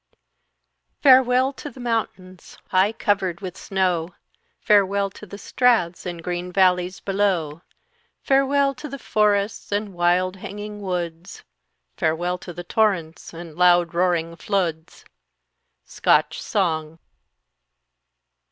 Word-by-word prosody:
"Farewell 260 0 +5
to 295 - -8
the 260 - -15
mountains, 195 -6 -4
high 190 +3 +3
covered 195 -5 -1
with 185 -3 -7
snow; 180 -3 -1 0.4
Farewell 200 -2 +2
to 210 - -12
the 200 - -9
straths, 210 -8 +1
and 170 -1 -6
green 180 +1 -4
valleys 180 -1 +2
below; 185 -6 -1 0.6
Farewell 275 +1 +2
to 300 +3 -7
the 275 - -6
forests, 210 -4 0
and 205 -1 -2
wild 180 +2 +1
hanging 205 +2 -8
woods, 180 - -5 0.5
Farewell 175 +2 -1
to 180 - -9
the 175 +1 -8
torrents, 180 -5 -1
and 170 -1 -10
loud 175 -1 +4
roaring 170 -1 0
floods!" 170 -4 -3 0.8
_Scotch - - +2
Song. 160 -6 -1
185 Hz, 110 wpm, -22 LUFS, 175-210 Hz, 0.8 s, Farewell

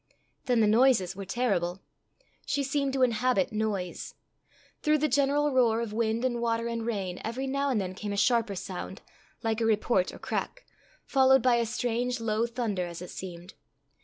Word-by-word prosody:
Then 245 -3 +3
the - - +5
noises 215 -5 +4
were 195 0 -6
terrible. 195 -5 0 0.7
She 280 0 0
seemed 275 0 0
to 265 -1 +2
inhabit 245 -4 +2
noise. 210 -5 -3 0.7
Through 305 0 +3
the 305 +1 +1
general 285 +2 +2
roar 235 -3 +3
of 230 -2 -4
wind 225 +2 0
and 240 -2 -1
water 230 0 0
and 230 -1 -3
rain 195 -5 -3
every 240 +4 -3
now 275 +1 0
and 250 -5 +1
then 185 -2 -3
came 205 +2 -5
a 200 - -3
sharper 230 -1 +2
sound, 185 +1 -6 0.4
like 225 0 0
a - - +2
report 215 -3 +2
or - - -10
crack, - - -4 0.4
followed 265 -1 +4
by 250 -2 +4
a 235 -1 0
strange 245 +1 -1
low 225 0 0
thunder, 220 -7 -2
as 170 0 -7
it 180 - -9
seemed. 180 0 -8
230 Hz, 180 wpm, -28 LUFS, 200-255 Hz, 0.7 s, the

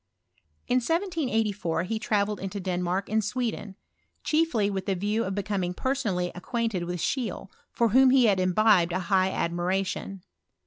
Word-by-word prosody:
In 250 +1 +3
1T84 235 - -1
he 220 +4 -2
travelled 210 -1 0
into 195 +1 -5
Denmark 180 +1 -2
and 220 +1 +1
Swed 210 -2 -3 0.5
chiefly 305 -9 +1
with 195 -2 -3
the 195 - +1
view 210 +5 0
of 190 -2 -3
becoming 195 -3 -2
personally 210 -10 -1
i - - -8
quainted 225 -3 -2
with 175 0 -4
Scheele, 220 - -3 0.2
for 235 -1 +1
whom 260 +4 +6
he 255 -1 +5
had 200 -4 +3
imbibe 185 -1 +3
high 185 +1 +1
admiration. 185 +2 -2
200 Hz, 145 wpm, -27 LUFS, 185-230 Hz, 0.5 s, whom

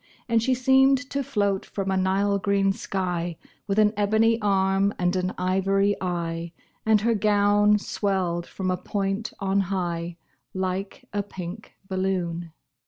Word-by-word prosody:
And 230 -2 +2
she 255 +3 +2
seemed 265 +2 +5
to 280 - 0
float 200 -6 0
from 195 -1 -3
a - - +1
Nile 195 +2 +1
green 195 -1 +2
sky, 180 -5 -3 0.3
With 200 0 -1
an 210 0 +4
ebony 220 +3 +2
arm 195 0 +2
and 180 +1 +1
an 185 0 -1
ivory 195 +2 +1
eye, 170 -2 -3 0.3
And 215 -2 +5
her 230 +2 +2
gown 205 0 +3
swelled 185 -4 -1
from 185 -1 -3
a 180 - 0
point 195 +3 -2
on 195 -1 +1
high, 175 -3 -2 0.4
Like 190 +1 -3
a 205 - 0
pink 190 +1 -8
balloon. 180 -3 -2
195 Hz, 145 wpm, -25 LUFS, 185-205 Hz, 0.4 s, seemed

